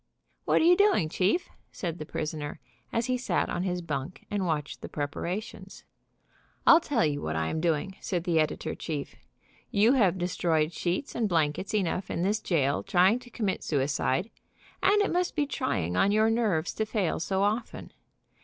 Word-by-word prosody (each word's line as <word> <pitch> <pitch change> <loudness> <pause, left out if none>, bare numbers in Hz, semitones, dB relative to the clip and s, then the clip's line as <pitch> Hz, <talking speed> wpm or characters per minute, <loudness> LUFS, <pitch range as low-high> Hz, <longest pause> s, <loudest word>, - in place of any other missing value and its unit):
"What - - +3
are - - +4
you 355 +1 +7
doing, 390 - +3
chief?" 195 - +1 0.2
said 170 -2 -4
the 155 - -6
prisoner, 150 -1 -4 0.3
as 230 0 0
he 255 0 0
sat 190 -8 0
on 175 - -1
his 180 -1 -2
bunk 150 +1 -5
and 200 -3 -1
watched 150 -3 -2
the - - -7
preparations. 185 +6 -5 0.8
"I'll 330 - +8
tell 280 - +1
you 145 -1 -1
what 80 0 -3
I 80 0 0
am 160 - -2
doing," 170 +3 0
said 175 -4 -2
the 170 -3 +2
editor 155 0 -1
chief 150 -4 -5 0.5
"You 215 +5 +4
have 195 -9 +3
destroyed 170 -3 0
sheets 180 +10 -2
and 225 -3 0
blankets 165 +4 0
enough 185 -2 -1
in 170 - -2
this 205 +3 +1
jail 145 -8 +1
trying 190 +6 +3
to 250 -1 -15
commit 205 -5 -2
suicide, 145 - 0 0.5
and 410 +2 +4
it 405 - -1
must 360 0 0
be 295 -2 +2
trying 90 - -2
on 195 - +3
your 215 +1 +3
nerves 210 -9 0
to 220 - -1
fail 210 -6 0
so 190 +3 0
often. 215 +4 -2
180 Hz, 180 wpm, -28 LUFS, 155-220 Hz, 0.8 s, I'll